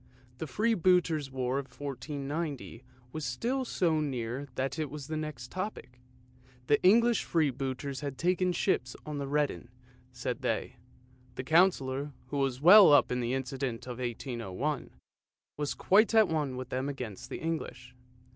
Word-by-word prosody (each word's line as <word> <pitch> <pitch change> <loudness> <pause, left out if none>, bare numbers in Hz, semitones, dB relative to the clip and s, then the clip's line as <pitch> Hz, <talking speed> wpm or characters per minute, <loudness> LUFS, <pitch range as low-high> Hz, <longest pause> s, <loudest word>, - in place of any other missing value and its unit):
The 160 - -4
Freebooter's 180 - +2
War 130 0 -1
of 140 - -6
1490 145 -1 -5 0.3
was 155 +2 -5
still 235 - -1
so 170 -9 +1
near 130 -1 -3
that 135 +3 -2
it 155 -2 -2
was 150 -2 -7
the 155 - -4
next 150 -5 -5
topic. 185 -10 -6 0.7
The 145 +2 +3
English 230 +4 +5
Freebooters 135 -3 -1
had 140 -3 -5
taken 180 +4 +1
ships 130 -9 0
on 150 -1 -4
the 140 - -3
Rheden, 145 - -1 0.4
said - - -4
they. - - -2 0.6
The 130 - -4
Councillor, 145 -3 +2 0.2
who 145 - -3
was 135 -2 0
well 185 +4 +9
up 145 -4 +5
in 125 - 0
the 120 +1 -1
incident 130 -2 -3
of 125 -1 -7
1801, 120 +2 -3 0.7
was 145 -1 -2
quite 215 +4 +4
at 220 -2 +7
one 150 -5 -1
with 130 -1 -6
them 130 +2 -2
against 125 -8 -6
the - - -4
English. 155 -6 -5
140 Hz, 150 wpm, -30 LUFS, 130-160 Hz, 0.7 s, well